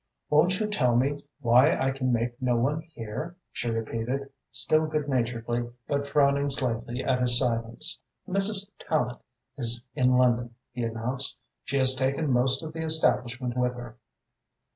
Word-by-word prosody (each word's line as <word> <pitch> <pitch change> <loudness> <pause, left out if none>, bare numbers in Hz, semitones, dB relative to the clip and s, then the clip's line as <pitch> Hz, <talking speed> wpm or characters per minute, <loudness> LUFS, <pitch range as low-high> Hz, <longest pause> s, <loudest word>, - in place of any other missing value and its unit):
"Won't 175 +5 +3
you 215 - 0
tell 130 - 0
me 140 +4 0 0.2
why 125 +4 +4
I 135 0 0
can 130 -1 -2
make 120 +1 -2
no 125 -1 +1
one 140 +7 0
hear?" 155 +1 -8 0.2
she 120 - -4
repeated, 115 +4 -4 0.2
still 155 0 +2
good 155 -2 -3
naturedly 120 -2 -2 0.2
but 140 0 -2
frowning 140 0 +2
slightly 125 -2 -1
at 130 -1 0
his 120 -1 +9
silence. 120 +5 0 0.3
"Mrs. 195 +1 +3
Tallente 125 -6 -2 0.4
is 120 -1 +3
in 125 0 +2
London," 120 -1 +1 0.2
he 120 0 -6
announced. 115 +4 -1 0.3
"She 140 - -2
has 130 -1 +6
taken 135 +3 -1
most 130 +3 +2
of 155 0 -7
the 160 0 -5
establishment 125 -5 +1
with 125 0 -1
her." 120 -1 -10
125 Hz, 155 wpm, -26 LUFS, 120-145 Hz, 0.4 s, his